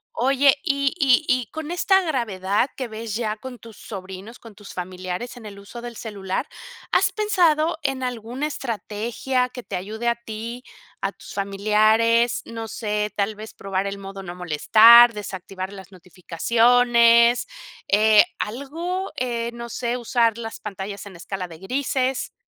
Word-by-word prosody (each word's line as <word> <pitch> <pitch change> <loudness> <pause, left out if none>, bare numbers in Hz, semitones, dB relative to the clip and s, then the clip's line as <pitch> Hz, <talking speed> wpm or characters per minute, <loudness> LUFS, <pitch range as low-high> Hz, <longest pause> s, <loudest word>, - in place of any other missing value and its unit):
Oye, 275 +3 +4
y 280 -4 +1
y 275 -1 +4
y 250 -3 +1
con 315 -1 -6
esta 385 +2 +3
gravedad 230 - 0
que 260 - -4
ves 220 -1 -6
ya 220 -2 -2
con 250 +1 -9
tus 225 -2 -13
sobrinos, 195 +3 -9
con 225 -3 -14
tus 205 0 -12
familiares 185 +6 -5
en 230 - -11
el 200 -1 -9
uso 200 +4 -10
del 240 -1 -8
celular, 200 -4 -4 0.4
¿has - - +3
pensado 340 -7 +2
en 265 -1 -1
alguna 250 +3 -3
estrategia 240 0 -2
que 250 - -8
te - - -6
ayude 215 +6 -4
a 235 - +3
ti, 235 +1 -7 0.4
a - - -1
tus - - -13
familiares? 215 +4 +2
No 225 -1 -6
sé, 210 -1 -2
tal 205 +1 -1
vez 215 +1 -10
probar 195 0 -3
el 200 0 -4
modo 195 0 -8
no 175 -2 -7
molestar, 220 +8 +7
desactivar 190 -2 -6
las 195 -1 -11
notificaciones. 235 +6 +3 0.4
Eh, 210 +1 +6 0.2
¿algo? 330 - -4
Eh, 235 -2 -2
no 235 0 -7
sé, 240 +1 -2
usar 235 -2 +1
las 225 -1 -6
pantallas 200 -1 -6
en 200 -2 -11
escala 185 +2 -5
de 165 -2 -12
grises. 260 +5 -1
230 Hz, 155 wpm, -23 LUFS, 200-250 Hz, 0.4 s, molestar